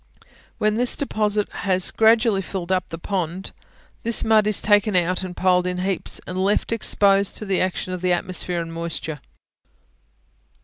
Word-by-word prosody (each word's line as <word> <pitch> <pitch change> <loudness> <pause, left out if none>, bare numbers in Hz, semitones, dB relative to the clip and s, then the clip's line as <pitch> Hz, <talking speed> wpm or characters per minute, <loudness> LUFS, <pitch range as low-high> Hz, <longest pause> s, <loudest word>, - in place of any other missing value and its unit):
When 215 0 +1
this 245 +1 +2
deposit 210 -6 0
has 185 -1 0
gradually 220 -2 +3
filled 185 -2 -5
up 185 -1 0
the 165 - -6
pond, 180 0 -4 0.5
this 230 0 +1
mud 215 -1 +3
is 215 - +2
taken 205 -1 +3
out 180 +1 +1
and 185 -1 -7
piled 180 -1 +2
in 180 0 -2
heaps, 185 0 -2
and 185 +1 -3
left 205 +3 0
exposed 200 -3 +2
to 215 - -3
the 195 -2 0
action 185 0 -2
of 180 - -5
the 180 0 +1
atmosphere 180 -1 -2
and 165 0 -7
moisture. 165 -2 -5
190 Hz, 165 wpm, -22 LUFS, 180-210 Hz, 0.5 s, gradually